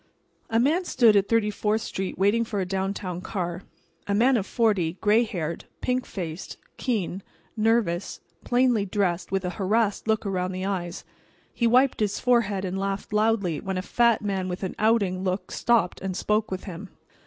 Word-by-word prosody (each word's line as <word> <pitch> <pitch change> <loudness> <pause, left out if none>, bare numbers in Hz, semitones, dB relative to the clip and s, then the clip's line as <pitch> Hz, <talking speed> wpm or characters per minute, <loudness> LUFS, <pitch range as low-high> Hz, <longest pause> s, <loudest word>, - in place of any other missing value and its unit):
A 225 - +2
man 310 +9 +2
stood 235 -10 +4
at 200 -1 +3
Thirty 225 -2 +2
fourth 210 +2 0
street 190 -2 -4
waiting 205 +4 +3
for 220 -3 -3
a 190 - 0
downtown 190 -1 -3
car. 180 -2 -3 0.5
A 200 - +1
man 250 +5 +4
of 205 -4 -1
forty, 205 -9 +1
gray 215 +3 +4
haired, 170 -7 -4
pink 255 0 -1
faced, 170 -2 -6 0.2
keen, 200 -6 -2 0.3
nervous, 215 -5 +1 0.2
plainly 245 -3 +2
dressed, 185 -4 -1
with 195 -1 0
a 180 - -1
harassed 210 +2 +1
look 220 -1 +1
around 185 -1 -1
the 185 +1 -3
eyes. 180 -3 -3 0.5
He 235 - +1
wiped 255 +3 +4
his 205 -2 0
forehead 210 -6 +2
and 190 +1 -3
laughed 195 +1 -3
loudly 210 -6 +1
when 190 -1 -3
a 185 - -2
fat 235 +1 +2
man 190 -2 -1
with 180 +2 -5
an 185 - -2
outing 205 -4 +2
look 185 0 -2
stopped 225 -7 +1
and 190 -1 -3
spoke 215 +1 0
with 185 -1 -4
him. 190 +1 -8
200 Hz, 175 wpm, -25 LUFS, 185-225 Hz, 0.5 s, stood